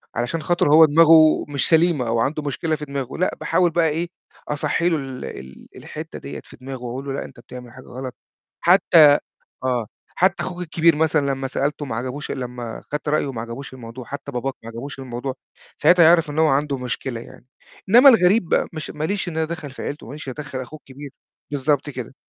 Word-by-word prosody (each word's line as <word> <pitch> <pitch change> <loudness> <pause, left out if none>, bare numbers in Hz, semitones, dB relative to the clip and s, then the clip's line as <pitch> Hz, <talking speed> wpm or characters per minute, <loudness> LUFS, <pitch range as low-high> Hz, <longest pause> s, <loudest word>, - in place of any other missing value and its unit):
علشان 120 +7 -2
خاطر 175 0 +1
هو 160 0 +9
دماغه، 160 0 +6
مش 140 -2 0
سليمة 160 -6 +3
أو 115 0 0
عنده 150 +5 -1
مشكلة 155 +3 -1
في 150 0 -7
دماغه، 140 -2 -5
لأ 185 - 0
باحاول 175 -2 +2
بقى 165 -1 +2
إيه 170 +3 -2 0.4
أصَحّي 165 +4 0
له 165 - +1
ال 135 -2 -6
ال 65 0 -10
الحِتّة - - -8
ديّة 70 +1 -8
في - - -16
دماغه، 130 0 -8
وأقول 125 +3 -5
له 135 - -3
لأ - - -4
أنت - - -14
بتعمل 125 0 -11
حاجة 130 0 -13
غلط، 130 0 -7 0.5
حتّى 165 -5 +6 0.5
آه، 125 -4 0 0.3
حتّى - - +2
أخوك 180 -1 -5
الكبير 165 -1 +2
مثلًا 150 -2 +2
لمّا 135 0 -3
سألته 145 +2 -2
ما 115 -5 -4
عجبوش 130 +4 -5
لمّا 125 -3 -5
خدت 150 0 -3
رأيه 145 -2 0
ما 115 - -5
عجبوش 120 +4 -8
الموضوع، 120 0 -9
حتّى 140 +1 -7
باباك 130 +2 -3
ما 115 - -9
عجبوش 130 +5 -7
الموضوع، 130 0 -5 0.4
ساعتها 175 -1 +5
هيعرف 165 -2 +4
إن 150 - -5
هو 160 - +5
عنده 140 0 +1
مشكلة 125 -1 -4
يعني، 120 - -14 0.4
إنّما 245 +7 +8
الغريب 195 -5 +5
بقى، - - +2
مش 155 -1 -6
ما 150 0 -5
ليش 195 0 -1
إن 165 - -5
أنا 160 - +1
أتدخّل 155 -3 -6
في - - -9
عيلته، 145 -5 -6
ما 125 - -9
ليش 150 -2 -8
إن 130 - -4
أنا 150 - -5
أدَخّل 130 -1 -5
أخوه 155 +5 -9
الكبير. 140 +1 -11 0.4
بالضبط 145 +1 0
كده. 130 -1 -7
140 Hz, 210 wpm, -22 LUFS, 130-160 Hz, 0.5 s, هو